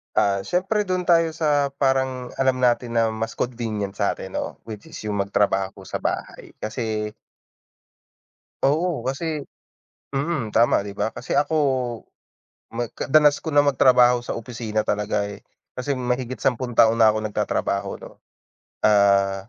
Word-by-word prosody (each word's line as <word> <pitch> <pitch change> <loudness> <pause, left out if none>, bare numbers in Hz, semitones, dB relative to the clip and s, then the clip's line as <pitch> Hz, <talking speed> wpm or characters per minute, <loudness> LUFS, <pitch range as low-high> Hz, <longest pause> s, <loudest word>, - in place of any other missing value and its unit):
Ah, 100 -1 +2
siyempre 195 - 0
do'n 185 -2 -2
tayo 165 -2 +4
sa 145 -3 +1
parang 130 -2 0
alam 130 -1 +1
natin 120 -1 +2
na 115 - +3
mas 115 +1 -3
convenient 110 -5 -3
satin - - -2
'no, - - -4
which 110 -2 -8
is 160 0 -10
yung 105 - -2
magtrabaho 100 -1 0
sa - - -5
bahay - - -4
kasi 110 -1 -3 1.5
Oo 160 +4 +1
kasi 150 +3 -3 0.7
mm, 140 -4 -2
tama 115 -1 +3
'di 100 0 -9
ba? 110 - -1
Kasi 130 - -1
ako, 145 +2 +1 1.2
mag 120 0 -2 0.2
danas 150 -1 +6
ko 160 - -5
na 145 - +6
magtrabaho 125 -3 +4
sa - - -3
opisina 115 -2 -3
talaga, 105 -1 -1
eh, 100 0 -11 0.3
kasi 135 +3 -1
mahigit 125 0 -3
sampung 125 -2 0
taon 115 0 +5
na 110 -2 +6
ako 110 - -2
nagtatrabaho 105 -2 -1
'no, - - -12 0.7
ah, 100 -1 +3
120 Hz, 140 wpm, -23 LUFS, 105-140 Hz, 1.5 s, danas